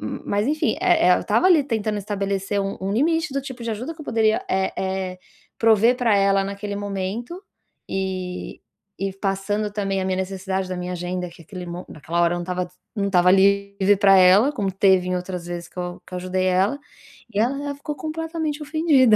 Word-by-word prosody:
hum, - - -5
mas 205 +3 0
enfim, 305 +2 +1
eh - - +4
eh, - - +6
eu - - -6
tava 370 - +3
ali 335 -6 +6
tentando 215 -5 -1
estabelecer 200 0 -2
um 195 0 -3
um 195 +1 -2
limite 310 +4 +1
do 275 - 0
tipo 260 -3 -8
de 230 - -2
ajuda 245 +10 -4
que 320 - -14
eu 305 - -8
poderia, 220 -1 +2
eh 190 0 0
eh, 190 -1 -3 0.4
prover 225 +2 +4
pra 230 -5 +3
ela 195 0 +3
naquele 200 +1 -5
momento 205 - -4 0.5
e 185 -1 -4 0.4
e 195 0 -2
passando 200 +2 -2
também 195 -2 -1
a 185 - -2
minha 185 0 0
necessidade 190 0 -3
da 185 - -3
minha 180 0 -4
agenda, 180 +1 -3
que 170 0 -15
aquele 180 +2 -8
mo 175 +1 -6
naquela 165 +3 -3
hora 170 0 +3
não 175 - -3
estava 180 0 -3 0.3
não 200 -1 0
estava 180 -2 +4
livre 200 +1 +3
pra 195 -1 +6
ela, 190 +9 +6
como 195 -8 -1
teve 190 -1 +3
em 180 - 0
outras 180 -1 -5
vezes 175 0 -6
que - - -29
eu 175 0 -4
que - - -10
eu - - -2
ajudei 185 +1 -1
ela, 190 +9 +2 0.6
e 200 - 0
ela 280 +5 0
ficou 295 +1 -5
completamente 315 0 -3
ofendida. 290 -6 +4
195 Hz, 205 wpm, -23 LUFS, 185-230 Hz, 0.6 s, eh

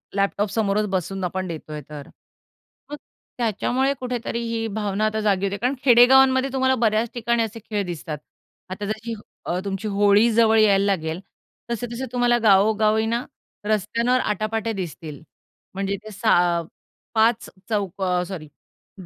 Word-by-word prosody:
Laptop 200 +1 0
समोरच 210 -1 0
बसून 190 0 -2
आपण 185 +1 -2
देतोय 155 -2 -7
तर? 145 -2 -9 0.8
मग - - -3 0.4
त्याच्यामुळे 250 +4 0
कुठेतरी 245 -2 -3
ही 225 -1 -2
भावना 210 0 -1
आता 215 0 0
जागी 200 -2 +1
होते. 200 +1 -2
कारण 250 +5 -1
खेडेगावांमध्ये 260 +2 +6
तुम्हाला 260 0 +2
बऱ्याच 225 -1 +1
ठिकाणी 235 -1 0
असे 225 +1 -5
खेळ 205 -2 -1
दिसतात. 160 -3 -5 0.5
आता 195 +2 -5
जशी 220 +2 -4
ह 210 - -9 0.2
अ, 180 +1 -1
तुमची 195 +2 -3
होळी 205 +2 +4
जवळ 225 0 +4
यायला 200 -2 +4
लागेल, 165 -4 -1 0.5
तसे-तसे 240 +2 -4
तुम्हाला 245 -1 +2
गावोगावी 215 +2 +4
ना 235 +2 -1 0.4
रस्त्यांवर 230 +4 +1
आटा-पाटे 215 +1 -2
दिसतील, 165 -5 -6 0.5
म्हणजे 195 +1 -2
ते 215 - -9
6 175 -5 +2 0.5
5 225 +1 +2 0.2
चौक 200 -3 -2
अ, 180 -1 +1
सॉरी 170 -6 -7 0.5
ब 185 - -10
215 Hz, 145 wpm, -23 LUFS, 195-230 Hz, 0.8 s, खेडेगावांमध्ये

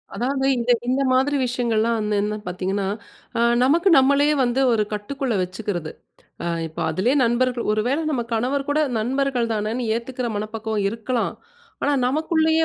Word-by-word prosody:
அதாவது 265 +2 -1
இந்த 240 +1 +1 0.2
இந்த 265 +2 +1
மாதிரி 270 +3 +2
விஷயங்கள்லா 235 -2 0
வந்து 210 -1 -1
என்னன்னு 210 0 -3
பார்த்தீங்கன்னா, 190 +2 -2 0.5
அ - - +2 0.2
நமக்கு 335 +8 +3
நம்மளையே 280 +3 +4
வந்து, 245 +2 +1
ஒரு 215 -2 +2
கட்டுக்குள்ள 250 +5 -3
வெச்சுக்கிறது. 185 -3 -4 0.5
அ - - -3 0.2
இப்போ 160 - -8
அதிலயே 190 - +1
நண்பர்கள் 240 +1 +1
ஒரு 215 - +1
வேள 275 +4 +1
நம்ம 260 -5 0
கணவர் 270 +5 -1
கூட 290 +2 +2 0.2
நண்பர்கள் 250 0 0
தானேன்னு 220 +4 -2
ஏத்துக்கிற 250 +1 -4
மனப்பக்குவம் 215 0 -3
இருக்கலாம். 230 +3 -2 0.5
ஆனா, 290 - +2
நமக்குள்ளயே 320 +3 +2
240 Hz, 145 wpm, -22 LUFS, 215-270 Hz, 0.5 s, நம்மளையே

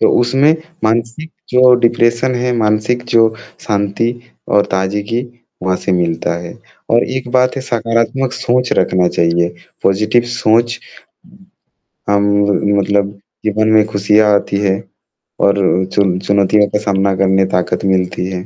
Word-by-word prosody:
तो - - +4
उसमें 135 +6 +3 0.3
मानसिक 115 +8 -1 0.2
जो 125 0 +5
डिप्रेशन 120 +2 +2
है, 125 0 -1
मानसिक 110 +2 0
जो 115 -1 +5 0.4
शांति 105 +2 -1 0.4
और 100 0 +4
ताज़गी 100 +5 -2 0.4
वहाँ 95 0 0
से 95 - -1
मिलता 85 -1 -1
है 85 - -8 0.4
और 115 +1 +3
एक 130 -1 -5
बात 130 +1 +2
है 135 - -3
सकारात्मक 115 +1 -1
सोच 125 0 -1
रखना 90 -1 +2
चाहिए, 85 0 +1 0.4
पाज़िटिव 105 +5 +2
सोच 120 0 +1 1.3
अम, 100 0 +1
मतलब 100 0 0 0.3
जीवन 110 +1 +1
में 110 -1 +5
खुशियाँ 105 +1 +2
आती 100 0 -1
हैं 95 -1 +1 0.7
और 100 - +3 0.4
चुन 95 -3 +1
चुनौतियों 100 +1 +2
का 105 - -1
सामना 100 -1 0
करने 95 0 +2
ताकत 90 +2 -1
मिलती 90 -2 0
है। 90 +1 -5
105 Hz, 135 wpm, -15 LUFS, 95-120 Hz, 1.3 s, जो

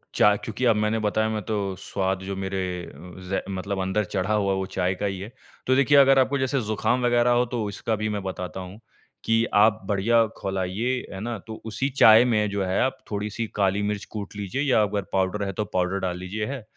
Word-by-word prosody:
चा 105 0 +5
क्योंकि 105 +4 -4
अब 115 -2 +5
मैंने 105 +1 +1
बताया 110 +1 0
मैं 110 -1 -2
तो 100 -3 -2
स्वाद 95 -1 -2
जो 100 +1 -4
मेरे 95 0 -3 0.3
अ, - - -11 0.3
ज़ 95 +1 -2
मतलब 95 +1 -3
अंदर 95 +3 0
चढ़ा 95 +1 -2
हुआ, 100 -2 +1
वो 95 0 -1
चाय 95 -1 -1
का 100 - -3
ही 95 -2 -2
है। 100 +4 -7 0.4
तो 130 - +4
देखिए 140 +2 +4
अगर 135 -1 +7
आपको 135 +2 +2
जैसे 130 0 0
ज़ुकाम 110 +3 0
वग़ैरह 120 0 +3
हो 120 +1 +3
तो 120 -2 -3
उसका 105 +2 -2
भी 110 0 -2
मैं 105 -1 -2
बताता 95 0 -5
हूँ 95 +3 -9 0.5
कि 115 0 +3
आप 105 +1 +4
बढ़िया 115 +3 +3
खौलाइए 95 +5 -2 0.2
है 95 - -6
ना। 115 +1 -3
तो 110 -1 -8
उसी 115 +5 -2
चाय 115 -3 +7
में 105 -4 +1
जो 100 -1 -1
है 95 +1 0
आप 130 - 0
थोड़ी-सी 105 +2 -3
काली 100 0 +1
मिर्च 105 0 -2
कूट 105 -2 -6
लीजिए 105 +6 -3
या 135 -6 +3
अगर 100 0 -1
पाउडर 95 +2 0
है 100 - -2
तो 105 +3 -2
पाउडर 95 +1 0
डाल 90 -2 -2
लीजिए। 95 +4 -4
अ, 135 -3 -5
105 Hz, 220 wpm, -25 LUFS, 95-115 Hz, 0.5 s, अगर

